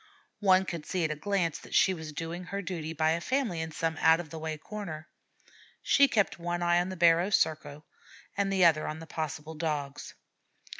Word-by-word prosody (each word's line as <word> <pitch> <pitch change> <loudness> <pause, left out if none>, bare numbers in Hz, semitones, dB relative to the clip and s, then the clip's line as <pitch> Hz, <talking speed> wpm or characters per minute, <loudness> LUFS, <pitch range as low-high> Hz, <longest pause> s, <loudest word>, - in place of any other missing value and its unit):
One 190 -2 +4
could 170 -4 -6
see 185 -3 -1
at 155 - 0
a - - -2
glance 170 0 -1
that - - -8
she 190 - +5
was 160 -3 -7
doing 165 +4 -5
her 200 +2 -4
duty 170 -3 -4
by 160 0 +1
a 165 +1 0
family 240 -8 -1
in 160 0 -4
some 160 0 -2
out 160 +1 +6
of 165 -4 -7
the 160 - -6
way 155 -1 -4
corner. 165 -3 -7 0.8
She 280 0 +5
kept 205 -8 +1
one 175 +1 -2
eye 175 0 +3
on 180 - -3
the 185 - -6
barrow 170 +2 +4
circle 155 -5 0 0.5
and 200 -1 0
the 190 -2 +4
other 155 -2 +4
on 155 - -4
the 165 - -9
possible 155 -1 -5
Dogs. 150 -3 -4
165 Hz, 205 wpm, -29 LUFS, 155-185 Hz, 0.8 s, out